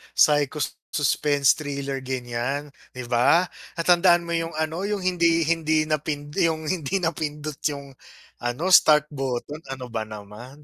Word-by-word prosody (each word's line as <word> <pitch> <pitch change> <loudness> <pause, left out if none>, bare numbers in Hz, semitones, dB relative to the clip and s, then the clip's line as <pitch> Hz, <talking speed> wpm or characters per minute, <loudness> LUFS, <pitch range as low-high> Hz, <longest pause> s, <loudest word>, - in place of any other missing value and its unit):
psycho 145 0 +3 0.2
suspense 145 -1 +2
thriller 140 -2 -4
ganyan, 130 +2 -3 0.2
'di 125 -1 -6
ba? 125 +9 +4 0.3
Na 165 - -1
tandaan 175 0 +5
mo 170 - -6
yung 165 -1 -2
ano 160 +5 -2
yung 205 -2 -2
hindi, 170 -2 +2
hindi 160 -1 +1
na 155 -1 0 0.4
yung 160 -1 +1
hindi 180 0 -1
napindot 150 -2 -3
yung 140 -2 -6 0.5
ano 125 +10 -2
start 150 -3 +6
button, 135 +1 -4
ano 130 -2 -7
ba 110 -1 -3
naman. 110 +7 -11
150 Hz, 140 wpm, -24 LUFS, 135-165 Hz, 0.5 s, start